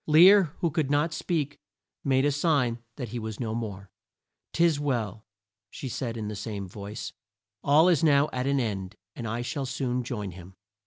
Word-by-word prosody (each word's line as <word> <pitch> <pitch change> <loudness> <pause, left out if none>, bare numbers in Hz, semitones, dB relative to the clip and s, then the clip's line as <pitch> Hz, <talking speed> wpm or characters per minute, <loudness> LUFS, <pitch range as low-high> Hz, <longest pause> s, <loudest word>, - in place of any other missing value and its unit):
Lear, 175 +2 +7
who 170 - +2
could 150 -2 0
not 150 +3 +2
speak, 155 -3 -2 0.4
made 135 0 +3
a 145 - +3
sign 140 -6 +1 0.2
that 125 -5 -5
he 120 +2 -4
was 110 -2 -5
no 110 -3 -2
more. 100 -4 -5 0.6
"'Tis 165 -3 +3
well," 115 -7 -2 0.4
said 130 - -6 0.2
she - - -5
in 105 - -3
the 105 - -4
same 100 -2 -5
voice. 100 +4 -7 0.5
"All 150 +4 +6
is 170 -5 +4
now 145 -2 +5
at 125 +1 -1
an 140 0 +2
end, 100 -5 -3 0.2
and 120 - -5
I 115 +2 -2
shall 135 +2 -3
soon 125 -1 -1
join 105 -6 -4
him." 90 +1 -12
125 Hz, 180 wpm, -27 LUFS, 110-145 Hz, 0.6 s, Lear